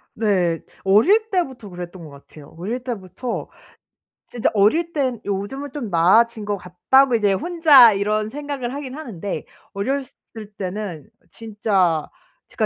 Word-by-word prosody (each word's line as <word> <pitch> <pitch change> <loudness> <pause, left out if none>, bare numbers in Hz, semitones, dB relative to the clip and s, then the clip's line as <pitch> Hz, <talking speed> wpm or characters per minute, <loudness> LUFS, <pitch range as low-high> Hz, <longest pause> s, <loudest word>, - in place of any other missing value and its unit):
네. 185 -6 +1 0.2
어릴 370 - +4
때부터 265 - -2
그랬던 175 0 -8
것 155 - -10
같아요. 140 +1 -15
어릴 225 +9 -4
때부터 235 0 -5 0.8
진짜 240 -2 -1
어릴 225 +12 +2
땐 260 -6 -1
요즘은 205 +9 -4
'좀 255 -7 -5
나아진 210 +6 +3
것 205 -1 -2
같다.'고 240 +9 +2
이제 205 -3 +2
혼자 285 - +6
이런 210 +2 -1
생각을 280 -2 -5
하긴 275 -2 -6
하는데 210 - -6 0.3
어렸을 260 +7 -3 0.4
때는 190 -3 -5 0.2
진짜 200 -8 0 0.4
제가 - - -1
215 Hz, 270 characters per minute, -21 LUFS, 190-265 Hz, 0.8 s, 혼자